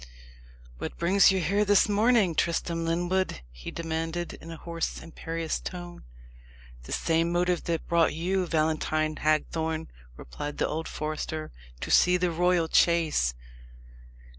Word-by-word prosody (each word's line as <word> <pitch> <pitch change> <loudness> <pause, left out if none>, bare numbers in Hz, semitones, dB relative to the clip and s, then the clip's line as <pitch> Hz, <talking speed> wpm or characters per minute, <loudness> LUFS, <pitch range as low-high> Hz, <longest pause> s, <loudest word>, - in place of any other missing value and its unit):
"What - - -5
brings 190 +4 +5
you 190 - +1
here 200 +5 +1
this 205 0 +4
morning, 210 -3 +3
Tristram 165 +1 0
Lyndwood?" 175 - 0
he - - -9
demanded, 165 +1 -3
in 165 - -11
a 165 - -7
hoarse 170 +1 -4
imperious 165 0 -4
tone. 175 - -8 0.8
"The - - -9
same 165 +1 +1
motive 175 0 +1
that 165 -2 -2
brought 170 -2 +3
you, 180 +3 0
Valentine 155 -1 0
Hagthorne," 160 +1 0 0.3
replied 145 - -7
the - - +1
old 160 +1 -3
forester 155 0 -4 0.3
"to - - -4
see 180 0 +5
the 180 -1 0
royal 175 0 +2
chase." 160 - +3
165 Hz, 135 wpm, -27 LUFS, 160-180 Hz, 0.8 s, brings